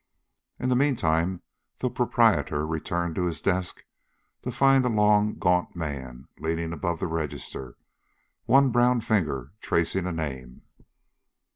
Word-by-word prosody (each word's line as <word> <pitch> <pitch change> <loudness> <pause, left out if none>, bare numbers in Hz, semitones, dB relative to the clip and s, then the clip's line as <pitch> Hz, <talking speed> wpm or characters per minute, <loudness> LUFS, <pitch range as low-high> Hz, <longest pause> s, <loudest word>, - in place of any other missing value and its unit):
In 130 - -1
the 125 - +3
meantime 90 - +1 0.3
the - - -1
proprietor 75 +1 +2
returned 85 +2 -2
to 90 +2 -1
his 80 -4 -3
desk 95 -1 -1 0.6
to 125 - -4
find 135 +1 +4
a 125 - +1
long, 105 -1 +3
gaunt 90 +1 +1
man 65 -6 -6
leaning 80 +1 -2
above 85 +1 -2
the - - -2
register, 75 -5 -5 0.7
one 135 -1 +5
brown 120 0 +3
finger 75 - -1
tracing 85 +1 +1
a - - -2
name. 65 -6 -6
85 Hz, 130 wpm, -26 LUFS, 80-105 Hz, 0.7 s, one